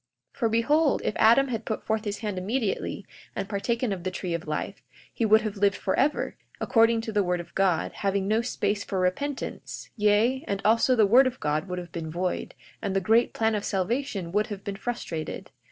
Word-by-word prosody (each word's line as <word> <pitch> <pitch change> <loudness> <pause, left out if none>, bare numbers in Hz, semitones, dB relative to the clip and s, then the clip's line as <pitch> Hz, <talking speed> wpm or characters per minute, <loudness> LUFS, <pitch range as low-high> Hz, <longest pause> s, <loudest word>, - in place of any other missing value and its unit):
42:5 - - -22
For 230 -3 +2
behold, 285 +7 +2
if - - 0
Adam 240 +5 +5
had 230 -2 -3
put 220 - -4
forth 220 0 -1
his 205 -1 -2
hand 205 -4 -2
immediately, 215 +2 -2 0.3
and - - -3
partaken 230 +2 -1
of 180 -3 -6
the 185 - -1
tree 180 -1 -4
of 170 -1 -4
life, 155 +6 -3 0.3
he 230 - 0
would 220 +1 +6
have 215 -1 -4
lived 200 0 +3
forever, 270 +9 0 0.2
according 230 -1 +3
to 225 - -5
the 210 -1 +2
word 180 -1 0
of 170 0 -9
God, 190 -4 +1
having 195 -1 -1
no 220 +2 +2
space 210 -3 -1
for 190 - -3
repentance; 260 +11 -3
yea, 220 +5 +2
and 200 - -1
also 230 +4 +4
the 220 -3 +5
word 250 +6 +6
of 255 0 -4
God 150 +4 -1
would 180 -1 -4
have 175 -1 -7
been 160 -1 -5
void, 180 +3 -3 0.3
and 195 -3 -2
the - - +4
great 225 +5 +3
plan 225 0 +2
of 210 -1 -1
salvation 200 -1 -2
would 210 +4 +1
have 205 -4 -7
been 200 -2 -4
frustrated. 195 -8 -5
210 Hz, 210 wpm, -26 LUFS, 190-230 Hz, 0.3 s, would